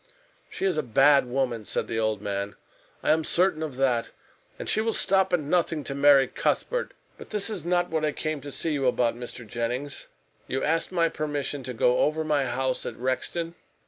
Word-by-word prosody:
"She - - -3
is 185 -5 +1
a - - +2
bad 135 +2 +4
woman," 125 -3 -1
said - - -2
the 115 - -2
old 110 -2 0
man. 100 0 -3 0.5
"I - - +3
am 160 +1 +3
certain 175 -1 +2
of 155 -5 -4
that. 125 -3 +1 0.5
And - - -6
she 215 - +2
will 225 0 0
stop 190 -1 +3
at 180 - +3
nothing 155 0 0
to 140 - -4
marry 140 -1 +6
Cuthbert. - - -1 0.2
But - - -11
this 210 0 -1
is 200 -5 -4
not 175 0 +1
what 160 -1 0
I 155 - +2
came 155 0 -3
to 145 +1 -7
see 160 - -1
you 135 -3 +1
about, 120 -2 +2
Mr. 120 0 -8
Jennings. 120 +6 -3 0.4
You 130 - -2
asked 165 +3 +1
my 170 -2 +3
permission 145 -3 -3
to 125 -1 -5
go 125 +2 +3
over 155 +1 +2
my 150 -3 +1
house 130 +1 -1
at - - -5
Rexton?" 165 +7 -2
145 Hz, 205 wpm, -26 LUFS, 125-165 Hz, 0.5 s, marry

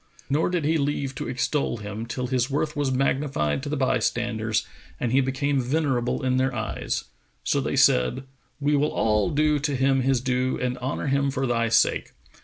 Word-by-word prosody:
Nor 150 +5 +2
did 175 -4 -1
he 160 +1 +2
leave 140 -1 -1
to - - -5
extol 125 0 -1
him, 105 +2 -6
till 125 +2 -3
his 125 0 0
worth 150 +2 -1
was 145 -2 0
magnified 135 - 0
to 145 - -5
the 150 - -1
bystanders 120 -4 0 0.3
and 120 - -1
he 135 +2 +4
became 135 +1 0
venerable 130 -2 0
in 130 0 +2
their 130 0 +1
eyes; 110 -1 -3 0.4
so - - +1
they - - -2
said, 60 - +3 0.4
"We 145 +1 +2
will 145 +2 +2
all 105 +3 +2
do 150 -1 +2
him 135 -2 +1
his 130 0 +2
due 130 +1 0
and 125 -1 -1
honour 130 +4 -3
him 140 0 +1
for 135 0 -1
thy 115 -2 +1
sake. - - +2
130 Hz, 185 wpm, -25 LUFS, 120-140 Hz, 0.4 s, he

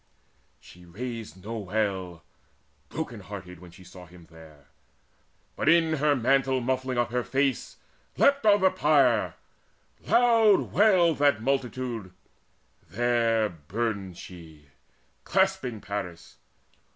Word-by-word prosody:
She 90 - -17
raised 105 0 -8
no 115 +1 -4
wail, 95 -4 -3 0.7
The - - -18
broken 125 -8 -4
hearted, 95 -3 -10
when 90 0 -13
she 90 +2 -16
saw 90 0 -13
him 85 0 -16
there, 80 -3 -16 0.9
But, - - 0
in 165 -1 +3
her 145 0 +2
mantle 135 +1 +1
muffling 130 0 -2
up 120 0 0
her 125 0 -1
face, 135 +2 -1 0.4
Leapt 280 0 +3
on 205 -2 +4
the 190 0 +4
pyre: 140 - +2 0.7
loud 230 -4 +4
wailed 185 -6 +4
that 140 -6 +2
multitude. 125 -6 -3 0.8
There 115 -1 +1
burned 95 +2 -4
she, 80 -5 -13 0.5
clasping 190 - 0
Paris. 95 -4 -7
120 Hz, 115 wpm, -26 LUFS, 95-140 Hz, 0.9 s, on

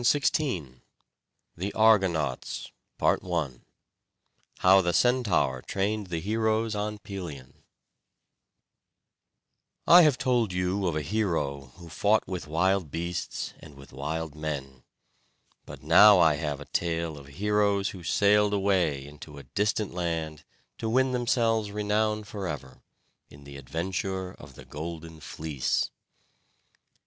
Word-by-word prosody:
CHAPTER 140 - +2
X 75 -5 -11 0.9
THE 95 +4 -3
ARGONAUTS 95 -9 +2 0.3
I 85 -6 +1 1.1
How 95 +1 +6
the 90 -1 0
Centaur 110 - +2
Trained 100 +4 -2
the 85 -2 -3
Heroes 110 +3 0
on 105 0 -3
Pelion 85 -11 -8 2.3
I 175 +1 +9
have 150 -6 +4
told 120 -6 +1
you 90 +2 0
of 85 - -1
a 75 - -1
hero 75 - -2
who 85 -1 -12
fought 105 +6 +1
with 90 -3 -5
wild 90 +2 +1
beasts 85 +3 -4
and 75 -2 -14
with 70 -1 -15
wild 75 +3 -4
men; 70 -4 -5 0.9
but - - -10
now 100 +6 +8
I 80 -3 +5
have 75 -1 -3
a 75 - -9
tale 85 +1 -2
of 70 -1 -12
heroes 100 -1 +1
who 95 - -9
sailed 105 +4 +3
away 90 -9 +1
into 75 0 -12
a 70 - -9
distant 105 - -1
land 80 -3 -3 0.4
to 110 - -2
win 130 +3 +2
themselves 115 -3 +1
renown 105 +1 0
forever, 80 -11 -6 0.5
in 70 0 -15
the 70 0 -11
adventure 90 +7 -3
of 65 - -14
the - - -12
Golden 80 +1 -7
Fleece. 75 -3 -2
90 Hz, 125 wpm, -27 LUFS, 75-105 Hz, 2.3 s, I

